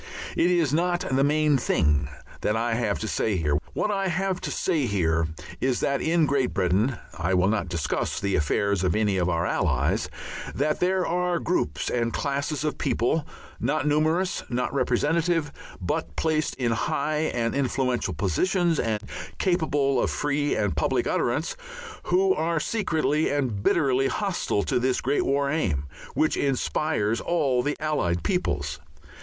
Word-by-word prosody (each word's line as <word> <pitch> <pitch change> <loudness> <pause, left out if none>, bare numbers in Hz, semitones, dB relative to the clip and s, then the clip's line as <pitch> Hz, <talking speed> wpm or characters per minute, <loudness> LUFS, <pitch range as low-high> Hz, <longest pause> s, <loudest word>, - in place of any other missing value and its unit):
It 175 - +3
is 170 -6 +2
not 175 +2 +1
the 135 +1 +3
main 150 0 +3
thing 75 - +2 0.3
that 105 - +1
I 115 +1 0
have 115 -3 0
to 110 - -2
say 110 -1 0
here. 75 -4 +1 0.2
What 210 - 0
I 195 -1 0
have 185 +1 -1
to - - -3
say 160 -8 0
here 85 -5 +1 0.3
is 130 -2 +1
that 140 0 +1
in 165 0 +3
Great 140 -3 0
Britain 100 +6 +1 0.2
I 90 +3 +1
will 90 +1 +3
not 105 -5 -1
discuss 85 -3 -1
the 100 -1 0
affairs 100 +6 +1
of 90 -3 +1
any 105 -3 +1
of 90 -1 +1
our 85 0 0
Allies - - 0 0.5
there 180 +6 +1
are 180 0 0
groups 75 - -1
and 115 -1 0
classes 140 +2 -2
of 150 - -2
people, 145 +7 0 0.3
not 145 +6 0
numerous, 155 +5 +1
not 125 +2 -1
representative, 150 +4 +1 0.3
but 80 -4 -3
placed 155 - 0
in 120 -3 0
high 150 +6 0
and 115 -1 -1
influential 125 - 0
positions 170 - +1
and 110 -2 -1 0.3
capable 145 -7 +1
of - - +1
free 145 0 0
and 105 -7 0
public 75 - +1
utterance, 145 +7 0 0.5
who 190 +1 +3
are 165 0 0
secretly 160 -6 0
and 130 -8 -1
bitterly 135 +2 +2
hostile 180 - -1
to - - 0
this 130 +1 +1
great 140 +3 0
War 140 0 +1
Aim, 85 - 0 0.3
which 155 - +2
inspires 135 -4 0
all 140 -8 +1
the 145 +4 -2
Allied 115 - 0
peoples. 75 - -1
140 Hz, 155 wpm, -25 LUFS, 105-160 Hz, 0.5 s, It